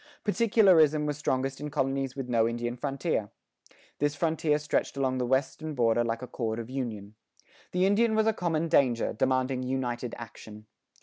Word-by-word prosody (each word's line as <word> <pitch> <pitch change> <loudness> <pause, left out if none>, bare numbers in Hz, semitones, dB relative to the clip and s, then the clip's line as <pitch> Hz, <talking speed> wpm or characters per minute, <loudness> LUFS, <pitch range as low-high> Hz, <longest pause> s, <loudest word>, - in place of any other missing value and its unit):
Particularism 190 -9 +4
was 150 0 -3
strongest 135 -1 -1
in 150 - -4
colonies 135 -2 -1
with 135 -2 -5
no 115 -2 +2
Indian 120 +1 -3
frontier. 135 -4 -2 0.7
This 145 0 +1
frontier 160 -1 +1
stretched 150 -1 -1
along 130 -1 0
the 125 - -1
western 140 +4 -1
border 120 -1 +2
like 115 +1 -3
a - - -5
cord 110 -3 -3
of 115 +1 -6
union. 110 -6 -5 0.6
The 180 +1 +2
Indian 220 +3 +3
was 220 0 +3
a 220 - +3
common 165 -4 -1
danger, 130 -7 +2
demanding 130 +2 0
united 125 -2 -3
action. 110 -2 -11
135 Hz, 165 wpm, -28 LUFS, 120-155 Hz, 0.7 s, Particularism